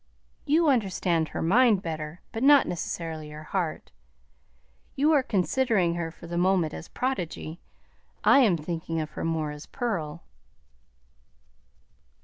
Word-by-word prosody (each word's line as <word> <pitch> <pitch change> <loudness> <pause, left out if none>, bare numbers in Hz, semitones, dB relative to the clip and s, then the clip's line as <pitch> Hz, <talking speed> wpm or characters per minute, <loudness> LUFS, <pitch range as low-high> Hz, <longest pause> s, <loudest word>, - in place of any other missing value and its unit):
"You 320 +3 +3
understand 185 - +1
her - - -4
mind 210 +2 +4
better, 155 0 -5
but 225 - -5
not 285 +1 +7
necessarily 160 -3 -4
her 150 +1 -9
heart. 170 -1 -3 1.0
You 300 +4 +3
are 290 - +5
considering 205 -4 +1
her 170 -1 -3
for 165 - -13
the 170 +1 -3
moment 180 -4 +2
as - - -8
prodigy; 175 -9 -3 0.6
I - - +6
am 210 -10 +4
thinking 165 +1 -4
of 155 -1 -4
her - - -6
more 160 -2 -1
as 150 0 -10
pearl." 175 - -3
175 Hz, 130 wpm, -27 LUFS, 160-230 Hz, 1.0 s, not